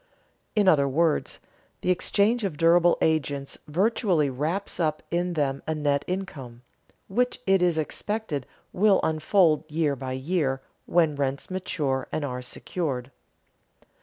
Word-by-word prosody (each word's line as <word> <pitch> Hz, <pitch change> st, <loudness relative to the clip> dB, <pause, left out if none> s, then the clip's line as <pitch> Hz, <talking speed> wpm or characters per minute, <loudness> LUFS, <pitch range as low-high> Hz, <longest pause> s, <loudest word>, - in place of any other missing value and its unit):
In 205 Hz, -2 st, +3 dB
other 145 Hz, -6 st, +5 dB
words, 160 Hz, +3 st, +1 dB, 0.4 s
the 180 Hz, -, +2 dB
exchange 210 Hz, +5 st, +1 dB
of 180 Hz, -7 st, -2 dB
durable 170 Hz, +2 st, +5 dB
agents 145 Hz, -3 st, 0 dB
virtually 180 Hz, -, +1 dB
wraps 160 Hz, +12 st, -2 dB
up 155 Hz, -2 st, 0 dB
in 175 Hz, +1 st, 0 dB
them 140 Hz, -4 st, -1 dB
a 160 Hz, -, 0 dB
net 145 Hz, -2 st, +1 dB
income, 140 Hz, -11 st, -5 dB, 0.4 s
which 245 Hz, +6 st, 0 dB
it 195 Hz, -1 st, +3 dB
is 175 Hz, -2 st, +2 dB
expected 160 Hz, -, -3 dB, 0.3 s
will 200 Hz, +1 st, +4 dB
unfold 160 Hz, 0 st, +3 dB
year 150 Hz, -2 st, 0 dB
by 130 Hz, -1 st, -5 dB
year 135 Hz, -1 st, -1 dB, 0.3 s
when 165 Hz, -4 st, +3 dB
rents 140 Hz, +3 st, -2 dB
mature 150 Hz, -8 st, -2 dB
and 150 Hz, -, -2 dB
are 125 Hz, -2 st, -4 dB
secured. 130 Hz, -1 st, -4 dB
160 Hz, 135 wpm, -26 LUFS, 140-185 Hz, 0.4 s, other